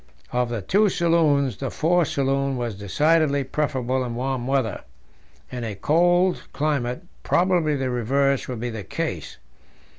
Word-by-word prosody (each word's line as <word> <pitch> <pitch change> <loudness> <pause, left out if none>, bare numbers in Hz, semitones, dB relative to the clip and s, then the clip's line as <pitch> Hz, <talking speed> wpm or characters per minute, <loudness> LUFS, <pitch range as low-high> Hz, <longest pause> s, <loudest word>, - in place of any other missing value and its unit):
Of 125 -1 0
the 115 -4 -4
two 205 - +3
saloons, 155 - +2
the 135 - -3
fore 175 +5 +2
saloon 135 -1 0
was 120 -2 -3
decidedly 140 - +1
preferable 130 -2 -1
in 120 -2 -4
warm 130 0 -2
weather; 135 -5 0 0.7
in 125 -1 -5
a 110 -3 -4
cold 175 - +2
climate 140 -1 -1 0.2
probably 175 -4 +2
the 135 -2 -2
reverse 135 +3 +1
would 125 -3 -5
be 120 0 -3
the 110 -2 -6
case. 80 - -4
135 Hz, 145 wpm, -23 LUFS, 120-155 Hz, 0.7 s, two